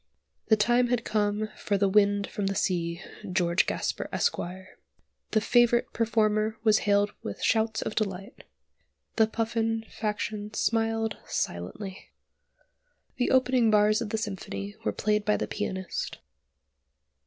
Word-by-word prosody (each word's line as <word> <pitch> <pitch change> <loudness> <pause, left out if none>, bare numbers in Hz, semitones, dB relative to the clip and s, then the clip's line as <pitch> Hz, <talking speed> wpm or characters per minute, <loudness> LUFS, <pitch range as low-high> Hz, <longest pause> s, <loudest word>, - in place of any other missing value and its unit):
The 220 - +6
time 240 +3 +3
had 240 -1 0
come 210 0 0
for 200 - -1
"The 200 0 +3
Wind 200 0 +3
from 200 0 -3
the 195 - -1
Sea" 170 -3 -1 0.3
(George 175 -1 +2
Gasper - - -2
Esq.). 475 - +1 1.0
The 215 - +3
favourite 240 +1 +3
performer 215 -1 +1
was 215 -2 +5
hailed 205 0 +3
with 100 - -6
shouts 220 0 +1
of - - -3
delight. 195 -2 -4 0.7
The 220 -1 +5
Puffin 225 0 -1
faction 210 0 -3
smiled 225 -1 0
silently. 185 - -4 1.1
The 245 - +1
opening 255 -3 +3
bars 215 +1 +4
of 225 - -3
the 220 - -1
symphony 200 -1 -5
were - - +1
played 210 0 0
by 210 0 +2
the - - -2
pianist. 190 -3 -4
215 Hz, 130 wpm, -28 LUFS, 200-225 Hz, 1.1 s, The